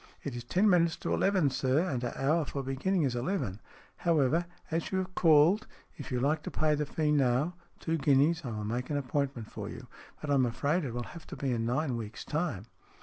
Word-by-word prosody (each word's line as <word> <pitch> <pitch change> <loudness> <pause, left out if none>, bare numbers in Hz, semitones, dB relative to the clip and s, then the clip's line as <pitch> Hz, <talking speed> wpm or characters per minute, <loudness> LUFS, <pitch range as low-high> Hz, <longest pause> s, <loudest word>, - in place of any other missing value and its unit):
" - - -31
It 140 -4 -4
is 120 - -5
ten 185 - +2
minutes 170 -4 +4
to - - -3
eleven, 185 -8 +2
sir, 135 +7 +1
and 125 -7 -2
our 120 - -3
hour 155 +5 +2
for 140 -1 -4
beginning 155 +7 0
is 130 -3 0
eleven. 120 - -2 0.4
However, 165 0 +2 0.2
as 165 +1 -1
you 190 - 0
have 185 0 -3
called, 165 +6 +5 0.3
if - - -8
you 125 - 0
like 150 +4 +1
to - - -5
pay 155 -1 +1
the 150 -1 -1
fee 150 0 0
now 140 +3 +2 0.3
two 165 0 -1
guineas 145 +3 +3
I 125 - -4
will 105 -2 -4
make 120 +4 -3
an 145 - 0
appointment 135 -4 -2
for - - -6
you, - - -8 0.3
but 150 - -3
I'm 135 -3 +4
afraid 145 +8 0
it 120 - -4
will 120 - -2
have 170 -2 -11
to - - -7
be 135 -2 -2
in 115 -1 -1
nine 130 0 0
weeks' 110 -1 -7
time." 150 - -2
145 Hz, 225 wpm, -30 LUFS, 125-165 Hz, 0.4 s, called